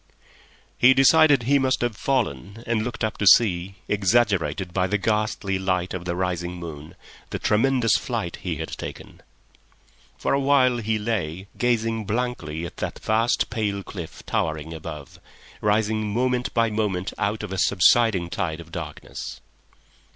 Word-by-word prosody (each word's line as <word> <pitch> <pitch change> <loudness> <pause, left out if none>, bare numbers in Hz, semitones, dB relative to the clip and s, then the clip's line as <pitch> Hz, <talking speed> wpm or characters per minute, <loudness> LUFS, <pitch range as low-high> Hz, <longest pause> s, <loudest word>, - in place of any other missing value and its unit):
He 130 +2 +7
decided 145 -1 +6
he 140 +4 +3
must 130 -1 +1
have 120 -3 -1
fallen, 115 -4 -2
and 115 -2 0
looked 120 0 -4
up 110 0 -2
to 100 - +1
see, 95 -2 +5
exaggerated 95 -5 +1
by 90 0 +1
the 105 +2 +1
ghastly 105 -1 -1
light 90 -1 -1
of 90 -1 -5
the 85 0 -2
rising 90 -1 -2
moon, 80 -4 -8 0.3
the - - -3
tremendous 115 0 +2
flight - - -4
he - - -4
had - - -5
taken. - - -8 1.0
For - - -1
a 140 - +2
while 135 -3 +3
he 110 -1 -1
lay, 100 -5 -3
gazing 115 -2 0
blankly 100 -9 -3
at - - -9
the - - -2
vast, 115 +3 +1
pale 100 -3 -2
cliff 85 -5 -8
towering 80 0 -2
above, 75 -3 -8 0.4
rising 105 0 +1
moment 125 +2 0
by 115 -1 +2
moment 105 -4 -1
out 105 +2 -1
of 105 - -6
a 95 - -3
subsiding 100 -2 +3
tide 80 -5 -2
of 85 -1 -12
darkness. 80 -4 -7
105 Hz, 150 wpm, -24 LUFS, 90-120 Hz, 1.0 s, He